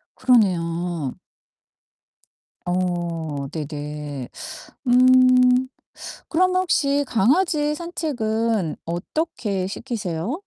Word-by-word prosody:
그러네요. 175 - +1 1.5
어 170 -5 -2
네네. 150 -3 -6 0.6
음 255 0 +5 0.6
그럼 365 +2 +2
혹시 285 -6 +2
강아지 295 - +2
산책은 230 - -2
어떻게 195 - -2
시키세요? 200 - -4
215 Hz, 145 characters per minute, -22 LUFS, 170-260 Hz, 1.5 s, 음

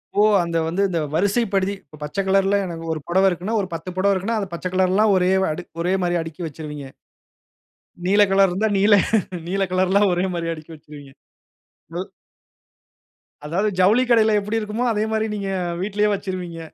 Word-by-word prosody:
ஓ! 205 - +4 0.2
அந்த 170 -1 -2
வந்து 175 +4 -1
இந்த 170 -2 -1 0.2
வரிசைப்படுத்தி 200 +1 +1
இப்ப 155 +1 -16
பச்ச 150 +7 -5
கலர்‌ல 195 +1 +3
எனக்கு 165 -2 -6
ஒரு 155 - -4
புடவ 190 +3 +3
இருக்குன்னா, 185 +5 -3
ஒரு 190 - -4
10 165 +2 -5
புடவ 200 +1 +3
இருக்குன்னா, 200 +5 -1
அது 195 - -4
பச்ச 170 - -7
கலர்லாம் 190 +3 +3
ஒரே 180 0 +2 0.2
அடுக் 175 +3 -7
ஒரேமாரியா 175 -1 0
அடுக்கி 165 +2 -8
வச்சிருவீங்க. 150 -2 -8 1.2
நீல 200 +3 +4
கலர் 195 0 +5
இருந்தா 200 +5 0
நீல, 205 +2 +5 0.5
நீல 195 +2 -1
கலர்லாம் 190 +2 +3
ஒரேமாரியா 175 -2 -1
அடுக்கி 155 +1 -12
வச்சிருவீங்க. 145 -2 -13 0.9
ம். 185 - -5 1.4
அதாவது 185 +8 0
ஜவுளி 210 +7 +4
கடையில 220 -2 +4
எப்பிடி 210 +3 -2
இருக்குமோ, 215 +3 -3
அதேமாரி 220 +1 0
நீங்க 200 -1 -4 0.3
வீட்டிலயே 210 +2 0
வச்சிருவீங்க. 185 -4 -5
190 Hz, 155 wpm, -22 LUFS, 170-205 Hz, 1.4 s, கலர்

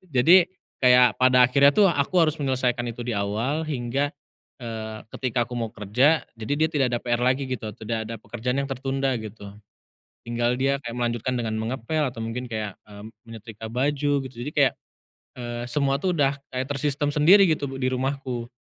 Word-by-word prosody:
Jadi 170 +8 +6 0.3
kayak 125 -3 +5
pada 130 0 +6
akhirnya 140 +3 +5
tuh 200 -3 +5
aku 145 +3 -1
harus 155 -1 +1
menyelesaikan 130 -3 0
itu 120 +1 -6
di - - -1
awal 110 +10 -1
hingga, 140 0 -1 0.5
eee, 110 -2 -6 0.2
ketika 125 -2 -1
aku 125 - -9
mau 115 -2 -3
kerja 125 +11 +2
jadi 110 +4 -3
dia 160 0 +3
tidak 140 -3 +2
ada 120 - 0
PR 120 -1 0
lagi 130 +2 +2
gitu, 115 -4 -4
tidak 110 0 -3
ada 115 - -5
pekerjaan 120 +3 -3
yang 140 - -6
tertunda 135 0 -1
gitu. 105 -2 -9 0.7
Tinggal 120 +1 0
dia 135 +1 +1
kayak 120 -2 -6
melanjutkan 120 +1 -1
dengan 115 -2 -2
mengepel 125 +7 -2
atau 120 - -16
mungkin 120 +2 -5
kayak, 110 -3 -4
eee, 105 0 -11 0.3
menyetrika 110 0 -9
baju 145 +4 0
gitu, 130 - -10
jadi 150 - -5
kayak, 140 -3 +4 0.7
eee, 120 0 -5
semua 140 +2 0
tuh 180 +2 0
udah 140 -2 +1 0.2
kayak 130 +1 -2
tersistem 145 +1 -1
sendiri 165 +8 +6
gitu 145 -2 -1
b 135 0 -6
di 130 - +1
rumahku. 130 -2 -3
125 Hz, 180 wpm, -24 LUFS, 115-140 Hz, 0.7 s, Jadi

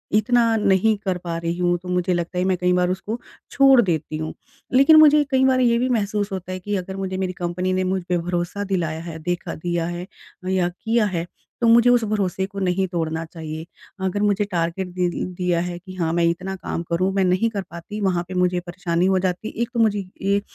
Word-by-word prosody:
इतना 230 +1 +3
नहीं 210 +1 +3
कर 185 -2 0
पा 170 -1 -4
रही 170 +1 -3
हूँ, 175 0 +1
तो 180 +1 -10
मुझे 180 0 +1
लगता 175 +1 -3
है 180 - +2
मैं 185 -1 +1
कई 180 +1 +1
बार 180 0 +2
उसको 195 +5 -3 0.3
छोड़ 270 -2 +6
देती 160 -6 -1
हूँ। 155 0 -4 0.4
लेकिन 275 +5 +7
मुझे 300 -1 +7
कई 265 0 +3
बार 260 -1 +3
ये 235 -2 +3
भी 255 +1 0
महसूस 210 -3 0
होता 185 -1 -5
है 185 - -4
कि 205 +3 -3
अगर 190 0 -4
मुझे 190 -1 -3
मेरी 185 -1 -2
कंपनी 180 +1 -2
ने 185 0 +1
मुझ 185 0 -1
पे 180 - +2
भरोसा 175 +3 -2
दिलाया 175 -5 -2
है, 165 -2 -7
देखा 175 +2 -3
दिया 175 0 -2
है 175 +1 -5 0.4
या 185 -2 +1
किया 225 +5 0
है 175 -4 -2 0.4
तो 235 - +3
मुझे 235 +1 +6
उस 245 -1 +4
भरोसे 200 -3 -1
को 200 0 -7
नहीं 190 0 +1
तोड़ना 165 -2 -2
चाहिए। 160 -1 -7 0.4
अगर 190 +2 -1
मुझे 205 0 +2
टारगेट 170 +2 -1
दे 180 0 +1 0.3
दिया 180 -1 0
है 175 0 -4
कि 185 +1 -11
हाँ, 165 -3 -1
मैं 170 0 +2
इतना 185 +3 -3
काम 180 - -4
करूँ 180 +3 +1
मैं 195 0 +2
नहीं 185 +5 +2
कर 205 -3 -3
पाती 170 +5 -7
वहाँ 180 -3 +1
पे 185 - -7
मुझे 180 0 +1
परेशानी 175 0 -2
हो 190 0 +3
जाती। 185 +3 -2
1 235 - 0
तो 235 - -1
मुझे 215 -2 +3 0.2
ए 200 +1 +1
185 Hz, 225 wpm, -22 LUFS, 175-205 Hz, 0.4 s, लेकिन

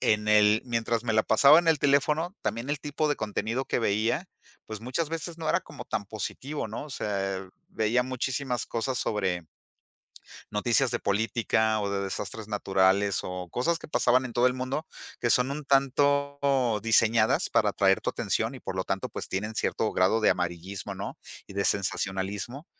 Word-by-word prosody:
en 105 0 +1
el 105 0 +5
mientras 115 -1 -1
me 115 -2 -1
la 110 - +4
pasaba 145 +7 +6
en 170 -1 +1
el 160 - +4
teléfono, 150 +6 +2
también 115 +6 -2
el 145 - -1
tipo 150 +1 -1
de 145 - +1
contenido 110 +4 -2
que - - -1
veía, 115 - 0 0.4
pues, 110 -1 -7
muchas 130 +7 -2
veces 165 +1 -5
no 160 -1 -3
era - - +2
como - - -10
tan 105 - -3
positivo, 130 +8 -4
¿no? 110 +7 -5
O 150 - -11
sea, 95 -5 -3 0.2
veía 115 +3 +1
muchísimas 130 -1 -2
cosas 125 +2 -2
sobre 95 -7 -1 1.0
noticias 120 +4 +2
de - - -1
política 110 +1 +1
o 100 -1 -2
de 100 0 -1
desastres 105 +2 -5
naturales, 100 -1 +2
o 90 -1 -6
cosas 165 - 0
que - - -11
pasaban 130 -3 +3
en 125 - -6
todo 120 +2 +3
el 125 - +2
mundo 130 +5 -3 0.3
que 120 - +1
son 125 +2 +3
un 150 +1 -4
tanto 140 -2 +2
diseñadas 115 0 +3
para - - +3
atraer - - +3
tu - - -1
atención - - -1
y - - -9
por - - -5
lo - - -1
tanto - - -2
pues - - -6
tienen 105 +4 -3
cierto 110 - 0
grado 95 +5 +3
de 110 - +4
amarillismo, 90 +2 -3
¿no? - - -6 0.3
Y - - -10
de 100 0 0
sensacionalismo 100 - -2
115 Hz, 180 wpm, -27 LUFS, 105-135 Hz, 1.0 s, pasaba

